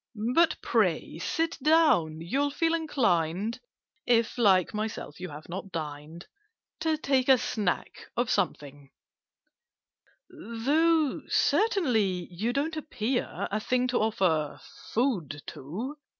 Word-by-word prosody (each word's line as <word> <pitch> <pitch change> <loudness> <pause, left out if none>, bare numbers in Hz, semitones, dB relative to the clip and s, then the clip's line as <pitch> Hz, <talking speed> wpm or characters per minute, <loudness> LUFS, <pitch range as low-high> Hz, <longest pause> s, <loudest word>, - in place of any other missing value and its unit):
But 335 0 +3
pray 180 -7 0
sit 325 - -1
down: 285 - +3
you'll 275 +12 0
feel 330 +3 0
inclined 220 - 0 0.5
(If, 230 -2 +3
like 190 -5 +4
myself, 215 -8 -4
you 185 - -5
have 150 +1 -10
not 190 +2 -6
dined) 155 +1 -6 0.5
To 315 0 +1
take 270 -3 +1
a 265 - +8
snack 205 -6 -2
of 245 0 +1
something: 145 - -2 1.4
"Though, 295 +7 +1
certainly, 225 - +2
you 210 +7 -1
don't 295 +5 -1
appear 250 -4 -2
A 215 - 0
thing 250 +3 0
to 245 - +1
offer 180 -9 +1 0.3
food 190 - -1
to! 225 - -6
225 Hz, 115 wpm, -28 LUFS, 170-280 Hz, 1.4 s, a